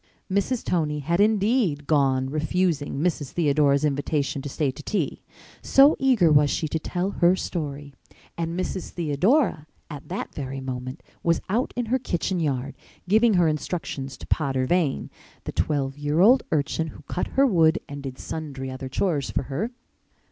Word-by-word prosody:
Mrs. 200 +5 0
Tony 150 -4 0
had 170 +5 0
indeed 205 - +2
gone, 135 -3 +2
refusing 155 0 0
Mrs. 150 -3 -1
Theodora's 145 -3 +3
invitation 145 -1 -1
to 145 - -6
stay 140 0 0
to 130 - -11
tea, 205 +7 -2 0.4
so 275 +2 +6
eager 245 -12 +4
was 145 -1 +5
she 160 - -1
to 160 - -1
tell 180 +4 -2
her 175 -1 +3
story. 145 -6 -5 0.4
And 165 +1 -3
Mrs. 185 0 -3
Theodora, 170 - +1 0.2
at 145 -2 -9
that - - -4
very 135 -1 -5
minute, 130 +2 -6 0.2
was 170 -1 +2
out 230 +6 0
in 245 -1 -1
her 255 +4 +1
kitchen 180 -5 -2
yard, 140 -3 -2 0.3
giving 220 +2 +4
her 175 -2 +4
instructions 150 -3 -3
to - - -10
Potter 135 -4 0
Vane, 165 -2 0 0.3
the - - -5
twelve 140 -2 -1
year 145 +2 0
old 240 +7 +6
urchin 155 +2 0
who - - -11
cut 180 - -3
her 275 - +6
wood 165 -9 +4
and 145 -1 -7
did 135 -2 -7
sundry 135 -4 -6
other 130 0 -6
chores 150 -1 0
for - - -1
her. 215 - -1
155 Hz, 165 wpm, -25 LUFS, 140-185 Hz, 0.4 s, so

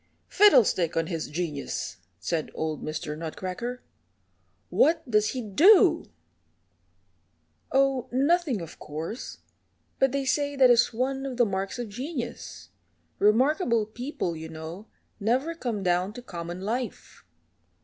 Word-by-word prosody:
"Fiddlestick 220 - +4
on 165 - +2
his 165 -2 -4
genius!" 150 - -4 0.2
said 155 - -2
old 155 -2 -3
Mr. 155 0 -4
Nutcracker; 185 +9 -5 0.9
"what 325 0 +3
does 215 -2 +3
he 255 -2 -4
do?" 355 - +5 1.6
"Oh, 270 -2 +2
nothing, 280 - +2
of 165 - -10
course, 160 - -6 0.6
but 270 -1 +3
they 275 -1 -1
say 285 +1 0
that 260 -2 +6
is 240 0 +4
one 265 +3 -2
of 265 -3 -5
the 240 - +5
marks 195 0 -3
of 240 -1 -4
genius. 250 +2 -6 0.5
Remarkable 235 - +3
people, 230 - -4
you 160 0 -7
know, 160 +6 -8 0.3
never 255 +10 +1
come 235 -11 -3
down 180 +2 +1
to 245 - -9
common 175 -3 -6
life." 230 +3 -4
230 Hz, 125 wpm, -27 LUFS, 175-270 Hz, 1.6 s, that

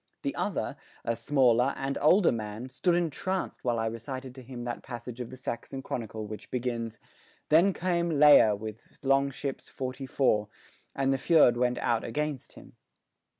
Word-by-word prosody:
The - - -1
other, - - -2 0.3
a 115 - 0
smaller 125 +1 +3
and 135 +1 -2
older 175 +5 +5
man, 110 +2 -5
stood 170 +7 +1
entranced 175 +3 -2
while 120 -2 +1
I 115 - 0
recited 125 +3 -5
to 130 - -11
him 125 -1 -8
that 120 -1 -4
passage 120 -1 -7
of 120 - -6
the 130 - -10
Saxon 135 +1 -5
Chronicle 110 -3 -4
which 105 0 -8
begins, 115 -2 -3 0.5
"Then 170 +6 +6
came 175 -2 0
Leija 145 -9 +7
with 110 +1 -9
longships 135 0 0
forty 130 +1 -5
four, 110 -6 +2 0.5
and 135 0 +2
the - - +1
fyrd 150 -6 +5
went 125 0 +1
out 115 -2 0
against 150 +2 -3
him." - - -15
130 Hz, 160 wpm, -29 LUFS, 115-140 Hz, 0.5 s, Leija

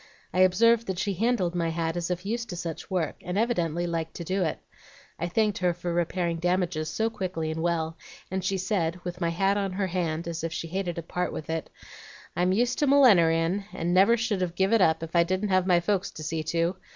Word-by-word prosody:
I 180 - 0
observed 225 +5 +4
that 190 -2 -2
she 200 +2 -1
handled 200 -3 +1
my 170 -2 0
hat 165 0 -2
as 175 0 -2
if 180 +1 -3
used 230 +3 -3
to 180 - -4
such 170 -2 -6
work, 180 -5 -1
and 180 +2 -4
evidently 175 -7 0
liked 165 -1 -3
to 170 - -5
do 190 +3 -1
it. 160 - -1 0.6
I 170 - -1
thanked 210 +3 +1
her 180 -2 +1
for 175 0 -3
repairing 170 0 0
damages 175 -2 0
so 225 +1 -1
quickly 180 -6 -3
and 160 0 -3
well, 165 -1 -1 0.3
and 190 0 -2
she 195 +1 0
said, 180 -3 -1
with 180 +1 -6
my 170 - +1
hat 195 +4 +1
on 195 -2 -1
her 195 +1 0
hand, 170 -3 -2
as 165 -1 -4
if 165 - -2
she 165 - -4
hated 180 -1 -2
to 170 - -5
part 180 +2 -2
with 155 - -5
it, 160 -1 -3 0.7
'I'm 180 +2 +2
used 240 +5 +1
to 295 - +2
millineryin' 190 -9 +4
and 175 +1 -1
never 195 +6 +5
should 220 -4 -1
have 175 -1 -2
give 190 +4 +2
it 225 - +5
up, 160 -2 +3
if 165 +1 -7
I 170 - +6
didn't 185 +4 -1
have 185 -1 +2
my 175 -2 +5
folks 195 +2 0
to 155 - -9
see 160 +1 -2
to. 170 +3 0
180 Hz, 235 wpm, -27 LUFS, 165-195 Hz, 0.7 s, I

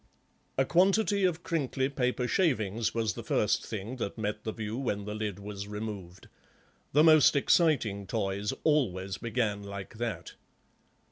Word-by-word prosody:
A 135 - +3
quantity 195 +4 +3
of 175 -2 0
crinkly 135 -5 0
paper 125 -2 -1
shavings 115 - +1
was 110 -2 0
the - - -7
first - - +1
thing 110 +4 -5
that 100 -3 -4
met 105 -1 -3
the 110 - -2
view 110 0 -5
when 110 -6 -2
the 105 - -4
lid 105 -3 -3
was 100 0 -7
removed; 105 -4 -7 0.6
the 150 +3 +5
most 155 -2 +6
exiting 125 - +2
toys 100 +2 -1
always 95 - +1
began 115 -3 -1
like 100 +2 -8
that. 110 -8 -4
110 Hz, 145 wpm, -30 LUFS, 100-135 Hz, 0.6 s, most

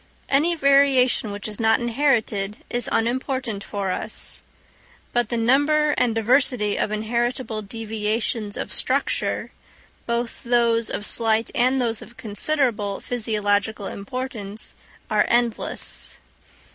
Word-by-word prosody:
Any 310 +5 +3
variation 275 -5 +4
which 205 0 -4
is 210 -1 -5
not 225 0 +4
inherited 230 -5 0
is 240 -1 -1
unimportant 240 -2 -1
for 200 -2 -3
us. 215 +4 -3 0.7
But 240 -2 +2
the 235 - -1
number 290 +6 +3
and 245 -5 +1
diversity 225 -2 +2
of - - 0
inheritable 230 +1 -1
deviations 215 0 -2
of - - -4
structure, - - 0 0.6
both 235 0 -2
those 235 -2 +2
of 205 - -4
slight 225 0 +2
and 255 +2 +2
those 230 -3 -1
of 235 - -13
considerable 215 -2 -1
physiological 210 -3 -1
importance, 215 0 -5 0.3
are - - +3
endless. 240 -1 -1
230 Hz, 115 wpm, -23 LUFS, 215-255 Hz, 0.7 s, variation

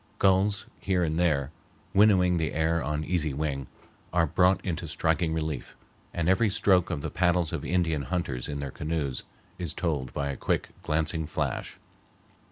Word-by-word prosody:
Gulls 100 +2 +3
here 95 -2 +1
and 80 0 0
there, 75 -5 +1 0.4
winnowing 95 -3 +5
the 80 -3 -1
air 80 +1 +1
on 75 0 -1
easy 80 -5 0
wing, 70 -3 -2 0.4
are 85 -1 +3
brought 90 +4 +3
into 85 -2 -2
striking 80 +1 +1
relief; 80 -4 -3 0.4
and 85 -1 -2
every 100 +4 +4
stroke 95 -2 +3
of 80 -5 -3
the - - -3
paddles 90 -2 +1
of - - -3
Indian 85 -4 +1
hunters 70 -5 -3
in 70 -1 -3
their 70 -2 -4
canoes 75 -4 -3 0.3
is 85 -4 -3
told 75 -7 -1
by 70 -1 -2
a 70 - -3
quick, - - -1
glancing 80 0 0
flash. 75 - -3
80 Hz, 165 wpm, -28 LUFS, 75-90 Hz, 0.4 s, winnowing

